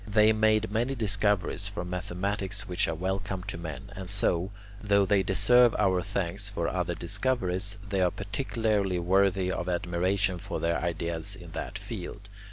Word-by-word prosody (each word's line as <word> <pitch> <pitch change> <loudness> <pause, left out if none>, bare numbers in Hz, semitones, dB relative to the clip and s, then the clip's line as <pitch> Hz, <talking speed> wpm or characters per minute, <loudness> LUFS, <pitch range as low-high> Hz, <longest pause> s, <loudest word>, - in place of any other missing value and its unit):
They 105 +1 +5
made 110 -1 +3
many 120 +5 0
discoveries 105 -3 +1
from 90 -3 -5
mathematics 95 +2 -2
which 95 +2 +1
are 80 - -1
welcome 95 +2 -2
to 100 -1 -4
men, 85 +4 -7
and 95 -2 -6
so, 95 -2 +1 0.3
though 100 -1 +3
they 100 0 +3
deserve 115 +5 +4
our 95 -3 +3
thanks 100 +1 -2
for 85 -5 -2
other 90 -1 -1
discoveries, 100 +1 -1
they 100 -2 0
are 90 - +4
particularly 100 -2 -1
worthy 95 +1 +2
of 90 -1 -2
admiration 90 +2 0
for - - -4
their 85 0 0
ideas 85 +2 -2
in 90 -3 -11
that 100 - -5
field. 100 -1 -7
95 Hz, 160 wpm, -28 LUFS, 90-105 Hz, 0.3 s, They